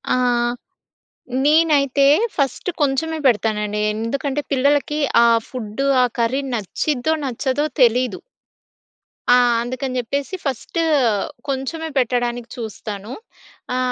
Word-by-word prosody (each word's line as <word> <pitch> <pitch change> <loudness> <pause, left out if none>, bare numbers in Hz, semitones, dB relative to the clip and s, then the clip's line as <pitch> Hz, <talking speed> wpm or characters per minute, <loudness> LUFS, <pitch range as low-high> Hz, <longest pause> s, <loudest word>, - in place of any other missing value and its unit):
ఆహ్, 240 -1 +1 0.9
నేనైతే 290 -3 +4 0.3
ఫస్ట్ 280 +4 -1
కొంచెమే 305 +3 0
పెడతానండి. 210 -2 0
ఎందుకంటే 270 +5 -2
పిల్లలకి 290 +3 +1 0.3
ఆ - - +6 0.2
ఫుడ్డు 250 +1 -4 0.2
ఆ - - +5
కర్రీ 250 +4 +1
నచ్చిద్దో 245 - -1
నచ్చదో 265 +3 -1 0.2
తెలీదు. 245 -2 +3 1.1
ఆ! - - +8 0.3
అందుకని 255 +1 -4
జెప్పేసి 280 +9 -3
ఫస్టు 275 +5 -2 0.7
కొంచెమే 295 +5 -3
పెట్టడానికి 245 -1 0
చూస్తాను. 215 -1 -6 0.6
ఆ! - - 0
255 Hz, 95 wpm, -20 LUFS, 235-280 Hz, 1.1 s, ఆ